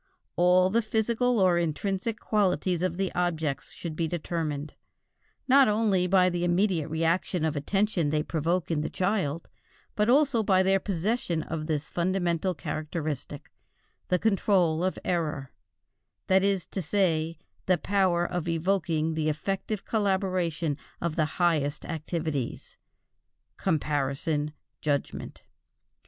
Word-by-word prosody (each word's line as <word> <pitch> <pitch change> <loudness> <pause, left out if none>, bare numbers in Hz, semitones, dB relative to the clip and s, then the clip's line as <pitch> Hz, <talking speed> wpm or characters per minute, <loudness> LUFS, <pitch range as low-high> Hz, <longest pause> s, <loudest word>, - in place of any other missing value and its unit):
All 180 +1 +4
the 230 +3 +3
physical 230 +2 +1
or 180 -2 +4
intrinsic 195 +7 -2
qualities 185 -4 +1
of 180 -2 -1
the 195 -1 -1
objects 160 -5 -1
should 165 -3 -6
be 165 +1 0
determined, 155 -3 -3 0.7
not 275 +1 +6
only 210 -4 +2
by 185 0 +4
the 175 -1 -1
immediate 175 -2 +1
reaction 165 +1 0
of 155 -1 -1
attention 185 +2 0
they 150 0 +1
provoke 170 +2 -1
in 155 -2 +1
the - - -2
child, 180 -5 -1 0.5
but 210 +1 +2
also 275 -3 +4
by 190 -3 +3
their 195 +1 +3
possession 185 -3 -1
of 155 -1 -4
this 150 -2 -2
fundamental 175 0 0
characteristic, 155 -1 -5 0.6
the 180 - +2
control 185 -5 +2
of 185 - 0
error, 150 -6 -1 0.7
that 190 0 +4
is 195 -3 +1
to 195 - -4
say 165 -2 0 0.3
the 185 -1 +4
power 185 -2 +1
of 175 -2 -3
evoking 165 -2 0
the 155 -1 0
effective 195 +6 -3
collaboration 185 -7 0 0.2
of 170 -2 -2
the 155 - +2
highest 160 -5 +1
activities 155 -5 -4 0.8
(comparison, 150 -2 -1 0.3
judgment). 145 -2 -3
175 Hz, 125 wpm, -27 LUFS, 155-195 Hz, 0.8 s, not